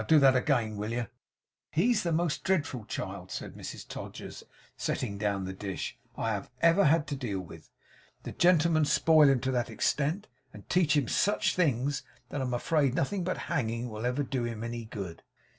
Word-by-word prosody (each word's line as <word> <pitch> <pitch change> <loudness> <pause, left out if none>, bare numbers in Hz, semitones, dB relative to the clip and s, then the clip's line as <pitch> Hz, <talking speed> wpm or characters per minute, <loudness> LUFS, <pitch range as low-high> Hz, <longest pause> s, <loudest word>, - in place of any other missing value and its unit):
Do 160 - +6
that 135 -2 +6
again, 120 -5 +1
will 105 +2 -3
yer?' 120 -2 -2 0.6
'He's 210 +6 +2
the 170 - -1
most 165 -1 0
dreadful 145 - 0
child,' - - -5
said - - -6
Mrs - - -8
Todgers, - - -8 0.3
setting 100 -5 -2
down 100 -2 0
the 95 - -4
dish, 95 0 -5 0.2
'I 110 -3 -1
ever 170 +4 +5
had 150 +1 +4
to 145 - -3
deal 115 -8 -3
with. 90 - -11 0.5
The - - -5
gentlemen 170 -3 +4
spoil 155 0 +5
him 135 -2 +3
to 130 - 0
that 120 -2 0
extent, 155 +8 0 0.3
and 105 - -12
teach 165 -4 +3
him 140 -5 +1
such 205 - +2
things, 140 -5 +1 0.3
that 140 - -3
I'm 125 -2 -1
afraid 140 0 +1
nothing 185 +8 0
but 185 +1 -1
hanging 120 -6 -1
will 110 +3 -3
ever 130 +4 0
do 130 -2 -2
him 115 -1 -4
any 115 0 -4
good. 95 -6 -7
135 Hz, 180 wpm, -30 LUFS, 115-160 Hz, 0.6 s, Do